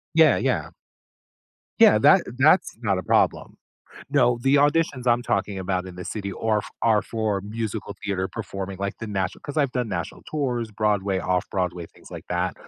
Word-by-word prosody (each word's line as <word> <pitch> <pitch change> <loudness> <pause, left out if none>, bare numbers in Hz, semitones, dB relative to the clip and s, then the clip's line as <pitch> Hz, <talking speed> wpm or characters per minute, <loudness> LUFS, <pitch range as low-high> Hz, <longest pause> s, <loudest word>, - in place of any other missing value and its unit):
Yeah, 160 -4 +6
yeah. - - -1 1.1
Yeah, - - +7
that - - +6 0.2
that's 155 +7 +4
not 100 -4 +1
a - - -3
problem. - - +1 0.6
No, 125 -4 +3
the 135 +1 +4
auditions 145 -3 +2
I'm 120 0 +3
talking 100 -4 -1
about 95 -1 -2
in 90 - -10
the 90 - -8
city 100 -2 -4
are 110 +2 0
f - - -9
are 110 -2 +4
for 110 -3 -2
musical 105 0 -5
theater 95 -2 -1
performing 95 -3 -6
like 100 +1 -3
the 110 - -5
natio 95 -2 -3
'cause 145 +2 -7
I've 140 -4 +2
done 125 -3 -2
national 85 -4 -4
tours, 125 -7 -2
Broadway, 100 -2 0
Off-Broadway, 90 -1 -2
things - - -18
like - - -8
that. 90 +1 -1
105 Hz, 175 wpm, -24 LUFS, 95-120 Hz, 1.1 s, Yeah